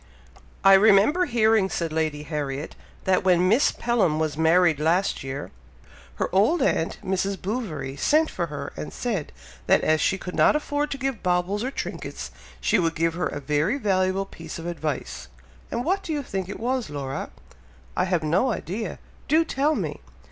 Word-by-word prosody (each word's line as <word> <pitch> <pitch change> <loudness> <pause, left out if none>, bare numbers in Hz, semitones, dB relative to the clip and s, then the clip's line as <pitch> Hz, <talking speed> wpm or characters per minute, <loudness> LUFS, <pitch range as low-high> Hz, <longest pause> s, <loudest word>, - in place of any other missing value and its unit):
"I 195 0 +8
remember 215 - +5
hearing," 220 - +3
said 165 -4 -2
Lady 155 -2 -1
Harriet, 145 -1 -4 0.3
"that 190 0 +2
when 180 -1 +4
Miss 225 +9 +4
Pelham 210 -10 +1
was 155 -2 -1
married 160 0 +4
last 170 +4 +1
year, 135 +1 -5 0.6
her - - -1
old 215 - +3
aunt, 165 - 0
Mrs. 190 +1 -1
Bouverie, 165 - -4
sent 310 - +3
for 170 -2 -2
her 145 -2 -6
and - - -6
said, 210 -11 -3 0.4
that - - +5
as 155 0 +2
she 190 - +2
could 180 -1 -7
not - - +4
afford 295 0 -1
to 275 - -3
give 270 -4 -3
baubles 180 +3 0
or 255 - -1
trinkets, - - -6 0.3
she - - +2
would 165 -2 0
give 165 0 +1
her 180 - -1
a - - -5
very 150 - 0
valuable 190 -4 +1
piece 195 - -9
of 165 - -8
advice; 155 -5 -4 0.4
and 240 - -3
what 385 +4 +1
do 335 - -6
you 295 -2 -1
think 190 -6 -4
it 205 - -6
was, 250 +1 -1
Laura?" 135 -2 -4 0.7
"I 180 - +2
have 175 -3 0
no 180 +12 +2
idea! 215 +1 -4 0.3
Do 320 +2 +4
tell 300 0 +1
me." - - -4
185 Hz, 175 wpm, -25 LUFS, 160-230 Hz, 0.7 s, I